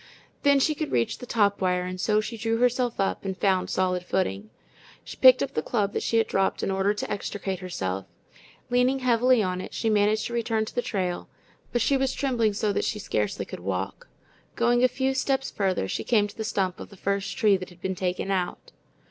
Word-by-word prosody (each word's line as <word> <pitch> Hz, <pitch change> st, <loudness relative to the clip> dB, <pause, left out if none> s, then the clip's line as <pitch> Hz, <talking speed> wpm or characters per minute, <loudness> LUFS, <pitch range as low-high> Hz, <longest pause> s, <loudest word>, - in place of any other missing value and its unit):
Then 280 Hz, -1 st, +5 dB
she 305 Hz, +3 st, +2 dB
could 305 Hz, 0 st, -4 dB
reach 115 Hz, -1 st, 0 dB
the 250 Hz, -, -9 dB
top 205 Hz, -4 st, +2 dB
wire, 180 Hz, -1 st, +1 dB
and 185 Hz, 0 st, -5 dB
so 210 Hz, +1 st, +2 dB
she 225 Hz, +2 st, -5 dB
drew 225 Hz, 0 st, -1 dB
herself 245 Hz, 0 st, +1 dB
up 195 Hz, -, 0 dB
and 190 Hz, -1 st, -3 dB
found 190 Hz, -2 st, +1 dB
solid 180 Hz, -1 st, 0 dB
footing. 105 Hz, -, -2 dB, 0.5 s
She -, -, -9 dB
picked 255 Hz, -1 st, +7 dB
up 275 Hz, -, -4 dB
the -, -, 0 dB
club 205 Hz, -4 st, -1 dB
that -, -, -1 dB
she 230 Hz, -, +1 dB
had 225 Hz, -, +4 dB
dropped 195 Hz, 0 st, 0 dB
in -, -, 0 dB
order 195 Hz, +1 st, +2 dB
to 210 Hz, -, -4 dB
extricate 200 Hz, -2 st, -3 dB
herself. 95 Hz, -, -4 dB, 0.6 s
Leaning 250 Hz, +2 st, +3 dB
heavily 250 Hz, -1 st, +4 dB
on 185 Hz, -1 st, -2 dB
it, -, -, -8 dB
she 225 Hz, -, 0 dB
managed 210 Hz, +1 st, +2 dB
to 240 Hz, -, -5 dB
return 225 Hz, -2 st, 0 dB
to -, -, -9 dB
the 245 Hz, -, 0 dB
trail, 185 Hz, -7 st, -3 dB, 0.4 s
but 240 Hz, -2 st, +1 dB
she 275 Hz, -, +3 dB
was 265 Hz, 0 st, 0 dB
trembling 240 Hz, -6 st, +1 dB
so 210 Hz, 0 st, 0 dB
that -, -, 0 dB
she 215 Hz, -, -1 dB
scarcely 105 Hz, -, -2 dB
could -, -, -8 dB
walk. 95 Hz, +1 st, -4 dB, 0.5 s
Going 240 Hz, +1 st, +3 dB
a -, -, +7 dB
few 265 Hz, +2 st, -1 dB
steps 270 Hz, 0 st, 0 dB
farther, 190 Hz, -, 0 dB
she -, -, -3 dB
came 215 Hz, -4 st, +3 dB
to 205 Hz, -, -13 dB
the 220 Hz, -, -4 dB
stump 190 Hz, -4 st, -1 dB
of -, -, -8 dB
the 200 Hz, -, -15 dB
first 200 Hz, +1 st, -2 dB
tree 210 Hz, -4 st, +4 dB
that 185 Hz, -1 st, -8 dB
had 175 Hz, -1 st, -17 dB
been 190 Hz, +1 st, -2 dB
taken 185 Hz, +1 st, -2 dB
out. 180 Hz, -2 st, -2 dB
205 Hz, 225 wpm, -26 LUFS, 185-240 Hz, 0.6 s, picked